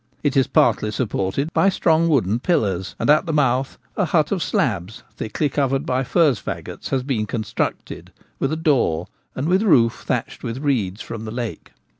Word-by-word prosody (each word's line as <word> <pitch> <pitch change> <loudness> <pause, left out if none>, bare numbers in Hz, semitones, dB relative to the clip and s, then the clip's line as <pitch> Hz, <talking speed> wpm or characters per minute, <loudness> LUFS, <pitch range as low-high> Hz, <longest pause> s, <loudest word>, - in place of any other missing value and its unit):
It 145 -3 +1
is 135 -2 +3
partly 110 -2 +3
supported 110 - -2
by 195 - +4
strong 165 -3 +2
wooden 115 - +2
pillars, 100 - 0
and - - -2
at 155 +4 +4
the - - 0
mouth 135 -3 +1 0.2
a - - +1
hut - - +1
of - - 0
slabs, 90 +5 -1
thickly 145 +7 -1
covered 135 0 0
by 130 -1 0
furze 150 -1 +2
faggots, - - -6
has 130 -2 0
been 120 -6 -1
constructed, 110 -1 -4 0.3
with 135 - 0
a - - 0
door, 140 - +1 0.3
and 135 +4 -2
with 185 +3 +3
roof 125 - +3
thatched - - -2
with 115 +1 -4
reeds 120 -8 -1
from 115 -2 -7
the - - -5
lake. 120 -1 -5
130 Hz, 180 wpm, -21 LUFS, 110-150 Hz, 0.3 s, by